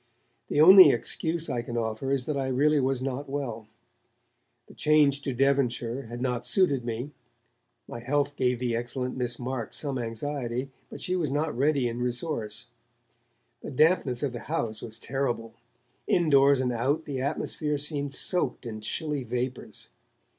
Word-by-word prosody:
The - - 0
only 185 +4 +10
excuse 165 0 -1
I 125 -4 -2
can 120 0 -6
offer 115 +4 -2
is 135 -2 0
that 150 - -2
I 135 -1 -1
really 145 +4 +2
was 130 -1 0
not 135 +1 -4
well. 120 -6 -4 1.0
The - - -16
change 150 -2 +3
to 140 - -3
Devonshire 130 -2 0
had 120 +2 -6
not 125 -2 -1
suited 145 -10 +4
me; 120 +4 -4 0.8
my 120 - -7
health 145 +4 -1
gave 125 -2 +1
the 120 -1 -1
excellent 125 +2 -3
Miss 125 -2 -2
Marks 125 -2 -3
some 140 -3 -1
anxiety, 125 +2 -3 0.2
but - - -10
she 180 - 0
was 165 -6 -1
not 150 +2 -1
ready 140 0 +1
in 120 0 -4
resource. 120 -4 -3 1.0
The - - -7
dampness 150 -3 +2
of 135 -3 -1
the 120 - -5
house 115 -9 -2
was 110 -1 -6
terrible; 120 -4 -3 0.5
indoors 140 -5 +4
and 125 -1 0
out, 140 +7 -1
the 135 -3 -4
atmosphere 150 +1 -1
seemed 145 -1 -2
soaked 175 +1 +2
in 110 -2 -6
chilly 150 +4 -2
vapours. 125 - -5
130 Hz, 160 wpm, -27 LUFS, 120-145 Hz, 1.0 s, only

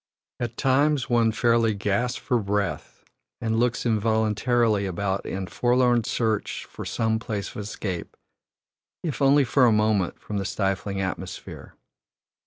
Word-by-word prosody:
At 120 -1 -4
times 140 0 +2
one 115 -2 +4
fairly 115 -1 +2
gasps 105 +5 0
for 125 - 0
breath 100 -1 -3 0.4
and 110 0 0
looks 120 0 0
involuntarily 110 -1 +2
about 95 +1 -2
in 95 0 -3
forlorn 120 +2 +2
search 110 -3 -1
of - - -6
some 110 0 0
place 105 -3 -4
of - - -11
escape, 100 -3 -5 0.9
if 155 -4 -3
only 140 +1 +5
for 130 0 +4
a - - +4
moment, 105 -4 +1
from 105 -1 -4
the 95 - -3
stifling 100 0 -1
atmosphere. 95 -1 -6
110 Hz, 135 wpm, -25 LUFS, 100-120 Hz, 0.9 s, only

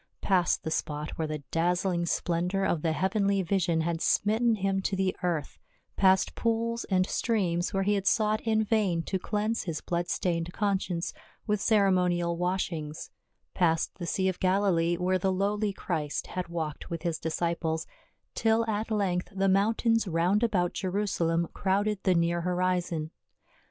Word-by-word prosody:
Past 185 -3 +2
the 160 - -3
spot 150 -1 -2
where 160 - -3
the 155 -1 -5
dazzling 175 +1 +1
splendor 180 +4 0
of 165 - 0
the 160 - +1
heavenly 195 +3 +1
vision 175 -2 +1
had 165 0 -2
smitten 220 +3 +2
him 195 -1 0
to 195 - -1
the 190 -1 0
earth, 170 -5 -2 0.4
past 190 -1 +3
pools 230 0 -1
and 185 -1 +2
streams 180 -7 0
where 195 0 0
he 205 +2 +2
had 200 -1 -1
sought 215 -1 +2
in 220 -1 +1
vain 200 -6 +1
to 190 - -2
cleanse 210 +3 -1
his 165 -4 -3
blood 175 0 -2
stained 170 -1 -1
conscience 190 -4 -1 0.3
with 210 -2 0
cere 205 -4 +4
monial 175 -2 +1
washings, 170 -3 -3 0.4
past 165 0 +1
the 175 - -4
sea 190 +2 0
of 185 -1 -1
Galilee, 185 -3 +2
where 185 +1 +1
the 190 +1 +1
lowly 205 +2 0
Christ 150 -6 -3
had 185 -1 -4
walked 160 -2 -5
with 170 -2 -5
his 170 -2 -1
disciples, 160 0 -1 0.5
till 225 0 +2
at 215 +1 -2
length 195 -5 0
the 195 0 0
mountains 220 +3 +2
round 180 +5 +2
about 195 -7 +1
Jerusalem 180 -4 0
crowded 200 +2 0
the 185 -2 +2
near 170 0 +1
horizon. 180 -3 -1
185 Hz, 160 wpm, -28 LUFS, 170-200 Hz, 0.5 s, cere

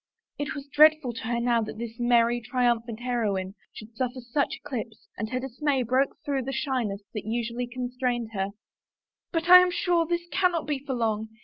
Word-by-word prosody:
It 290 -1 -3
was 280 -1 -6
dreadful 300 -2 +5
to 230 - -7
her 235 0 0
now 235 -1 +2
that 215 - -5
this 230 0 -7
merry, 240 0 +3
triumphant 235 -1 0
heroine 210 -6 -1 0.2
should 220 +1 -12
suffer 255 +1 -2
such 250 +4 -1
eclipse 240 -6 -7
and 215 0 -4
her 255 +1 -1
dismay 265 +1 -1
broke 255 +4 +1
through 280 -2 0
the 270 - -3
shyness 250 -7 -2
that 210 -3 -5
usually 235 +2 -2
con 250 0 -5
strained 245 -3 -2
her. 195 -1 -1 0.5
" - - -66
But 330 -1 -1
I 365 0 +11
am 365 0 +4
sure 350 -2 +1
this 345 0 -2
cannot 360 -4 +1
be 295 -2 -1
for 270 -2 -3
long. 220 -2 -1
245 Hz, 195 wpm, -27 LUFS, 230-280 Hz, 0.5 s, I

